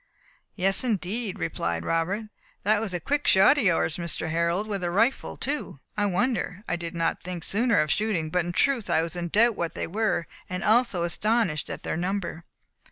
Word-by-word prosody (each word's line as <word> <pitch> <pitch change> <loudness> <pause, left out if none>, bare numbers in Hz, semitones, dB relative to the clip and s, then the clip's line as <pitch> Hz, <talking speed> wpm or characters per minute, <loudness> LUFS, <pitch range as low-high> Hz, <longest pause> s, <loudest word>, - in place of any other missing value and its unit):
"Yes, 195 +2 +2
indeed," 215 -1 -2
replied 85 - -2
Robert; 165 +6 0
"and 215 - -12 0.3
that 210 +1 +3
was 220 -4 -3
a 175 - -2
quick 290 - -1
shot 195 +10 +6
of - - +1
yours, 165 -4 +2
Mr. 170 -2 -3
Harold 170 +4 +1
with 200 -3 -3
a 175 - 0
rifle 225 +9 +1
too. 280 - -3 0.2
I 205 -1 +1
wonder 200 -1 -1
I - - 0
did 170 -1 -5
not 165 0 0
think 180 -2 -6
sooner 230 +4 +2
of 155 -1 +2
shooting; 190 -8 0
but 180 0 +2
in 175 - -3
truth 250 +3 +1
I 160 - +3
was 165 +1 -5
in 175 -1 -3
doubt 225 +6 +3
what 170 -3 -3
they - - -2
were, 205 -2 0 0.2
and 180 0 -3
also 220 -5 +3
astonished 200 -1 0
at - - -6
their - - -2
number." 180 -2 -3
185 Hz, 200 wpm, -26 LUFS, 170-220 Hz, 0.3 s, shot